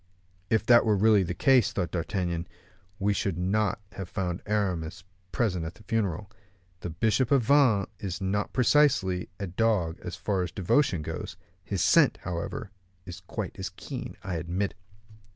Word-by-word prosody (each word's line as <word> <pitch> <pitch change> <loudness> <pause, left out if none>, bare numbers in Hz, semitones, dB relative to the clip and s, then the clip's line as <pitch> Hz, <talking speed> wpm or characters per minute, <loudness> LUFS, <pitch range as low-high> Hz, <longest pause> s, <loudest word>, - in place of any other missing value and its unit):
"If 110 -1 +2
that 120 0 +7
were 110 -2 +3
really 105 0 +5
the 90 -1 -2
case," 130 +3 +4
thought 85 - -2
D'Artagnan, 85 -1 -2 0.5
"we 100 +1 +1
should 95 -3 -1
not 105 +5 0
have 95 -2 -7
found 90 -2 -3
Aramis 95 -4 -1 0.3
present 95 -8 0
at 80 +1 -6
his 105 - -18
funeral. 100 -2 -1 0.5
The 90 - -5
bishop 110 +9 +1
of 140 -4 +4
Vannes 125 -7 +4
is 95 -3 -4
not 100 +1 -1
precisely 125 -9 +3
a 100 - -2
dog 95 -3 0
as 90 - -6
far 100 -3 -1
as 90 -1 -3
devotion 95 - +1
goes: - - -6 0.3
his 95 -3 -1
scent, 85 - +5
however, 90 +3 -4 0.3
is 90 -1 -8
quite 90 - -6
as - - -3
keen, - - -7
I 90 -3 -3
admit." 90 +5 -2
95 Hz, 160 wpm, -28 LUFS, 90-110 Hz, 0.5 s, that